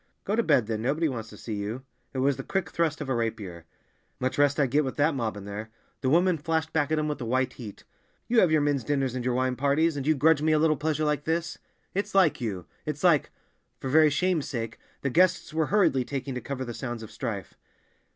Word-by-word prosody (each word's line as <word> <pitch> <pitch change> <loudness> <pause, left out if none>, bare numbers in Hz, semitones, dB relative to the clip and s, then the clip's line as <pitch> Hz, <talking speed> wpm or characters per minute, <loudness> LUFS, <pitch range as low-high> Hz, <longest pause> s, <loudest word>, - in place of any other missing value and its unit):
"Go 205 - 0
to 235 - +3
bed, 145 - +3
then. 110 0 -3
Nobody 150 +7 +1
wants 115 -5 -5
to 105 - -12
see 110 - -6
you!" 105 +6 -4 0.3
It 135 - -7
was 140 -1 +3
the - - -6
quick 185 -5 -2
thrust 160 -2 0
of 140 - -4
a - - +2
rapier. 110 -8 -3 0.5
"Much 130 +2 -1
rest 145 0 +3
I'd 135 -4 +2
get 150 +3 +3
with 130 - -4
that 150 +2 +2
mob 115 -6 -2
in 100 - -8
there." 105 +2 -6 0.3
The 130 - +1
woman 175 +2 +3
flashed 160 +1 -1
back 150 -1 +1
at 155 - +2
him 155 0 0
with 150 -3 -3
a - - -3
white 130 +2 0
heat, 110 -5 -10 0.4
"You 235 0 +4
have 180 - +5
your 155 -1 +4
men's 145 -3 +1
dinners 135 -3 0
and 125 -1 -3
your 125 0 0
wine 130 0 +1
parties—and 145 +1 +1
you 155 - +4
grudge 150 +1 +4
me 155 +1 +3
a - - +4
little 155 0 +3
pleasure 155 +1 -1
like 150 -1 0
this! 165 +1 -1 0.3
It's 200 +1 -2
like 180 -8 +4
you; 95 -7 -3 0.2
it's 150 +1 -5
like—" 170 -5 +4 0.5
For 130 - -4
very 155 +1 +6
shame's 165 +1 0
sake, 115 -5 -4 0.2
the 140 - -1
guests 180 +1 +3
were 160 -1 +1
hurriedly 185 -11 +3
talking 135 +1 -4
to 125 - -4
cover 130 -2 -4
the 120 - -5
sounds 120 -2 -5
of 110 - -10
strife. 105 - -5
140 Hz, 240 wpm, -27 LUFS, 120-155 Hz, 0.5 s, very